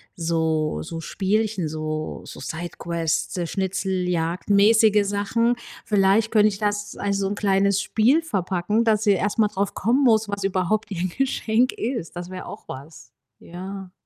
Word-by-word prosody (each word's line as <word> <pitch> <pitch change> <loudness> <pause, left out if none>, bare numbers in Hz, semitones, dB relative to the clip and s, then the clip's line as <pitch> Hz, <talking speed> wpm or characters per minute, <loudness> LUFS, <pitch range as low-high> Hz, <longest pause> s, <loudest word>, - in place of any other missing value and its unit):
so 160 -2 0
so 165 0 -6
Spielchen, 200 0 -1
so 155 0 -4
so - - -10
Sidequests, 170 0 -3
schnitzeljagdmäßige 195 +3 +2
Sachen. 225 +4 +1 0.3
Vielleicht 205 +2 +3
könnte 215 -1 +5
ich 200 -2 -2
das, 205 0 -2
als 200 -1 -1
so 195 -1 0
'n 200 - -2
kleines 200 -1 +2
Spiel 250 +9 +3
verpacken, 205 - -1
dass 215 -1 +2
sie 205 - +4
erst 200 +3 -1
mal 215 - +4
drauf 200 -1 -2
kommen 240 +7 +1
muss, 220 -2 +3
was 200 -1 -3
überhaupt 195 +3 0
ihr 180 0 -2
Geschenk 250 0 +1
ist. 230 -9 -4
Das 175 0 -6
wäre 185 0 -7
auch - - -10
was. 140 +5 -10 0.3
Ja. 185 +1 -8
195 Hz, 150 wpm, -23 LUFS, 175-215 Hz, 0.3 s, könnte